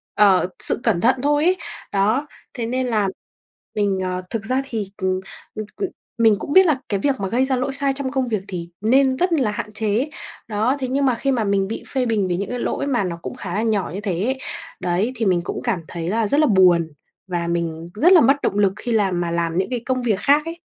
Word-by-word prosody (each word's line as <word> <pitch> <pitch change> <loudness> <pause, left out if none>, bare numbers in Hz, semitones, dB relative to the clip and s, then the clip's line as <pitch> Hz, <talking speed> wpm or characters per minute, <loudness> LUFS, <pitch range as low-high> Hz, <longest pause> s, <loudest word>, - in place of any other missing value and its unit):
ờ, 195 -4 +5
sự - - +2
cẩn 170 - +2
thận 250 +3 +4
thôi 295 +1 +2
ấy, 370 +1 +3 0.4
đó, 220 +9 +1 0.3
thế 235 -3 -3
nên 255 +2 -1
là 210 -4 +1 0.7
mình, 200 -2 +1
ờ, 185 0 -2
thực 225 -2 -3
ra 255 +4 0
thì, 215 -7 -4
cần 190 -2 0 0.4
c 215 -1 -5
c - - +1 0.4
mình 220 -2 +5
cũng 285 - -4
biết 380 0 +8
là 295 -6 +2
cái 200 -2 0
việc 275 +4 +1
mà 195 - -1
gây 255 +4 +2
ra 265 -1 +1
lỗi 265 +2 -2
sai 275 -1 +1
trong 270 -1 -3
công 265 -3 0
việc 215 -4 -2
thì 170 -2 -5
nên 260 +3 +3
rất 360 -1 +1
là 255 -9 +2
hạn 210 0 -5
chế, 220 +7 0 0.4
đó. 220 +5 +1
Thế 260 - -2
nhưng 275 +2 +1
mà 255 -3 +3
khi 275 +3 0
mà 235 -4 +1
mình 200 -1 +1
bị 225 - -5
phê 260 -2 0
bình 210 -5 +1
vì 175 -1 -1
những 200 0 -3
cái 250 - -3
lỗi - - -2
mà 250 -6 +1
nó 170 -2 -4
cũng - - -6
khá 180 -3 -6
là 215 - +1
nhỏ 215 -4 0
như 200 - -4
thế 185 -3 -2
ấy, 265 +1 0 0.4
đấy 185 +8 0
thì 225 -1 -1
mình 180 -2 +2
cũng - - -4
cảm 235 -7 0
thấy 170 0 -4
là 220 0 +1
rất 285 +7 +2
là 305 - +4
buồn 180 -5 +4 0.4
và 175 -2 -2
mình 170 -1 -2
rất 345 - +5
là 335 - +8
mất 275 +1 +5
động 200 - 0
lực 195 -2 +3
khi 240 - -4
làm 195 -6 +1
mà 170 -1 -2
làm 170 0 -1
những 190 - 0
cái 245 -2 -2
công 255 -1 -1
việc 215 -5 +1
khác 295 +3 +3
ấy. 335 +1 -6
220 Hz, 255 wpm, -21 LUFS, 190-260 Hz, 0.7 s, biết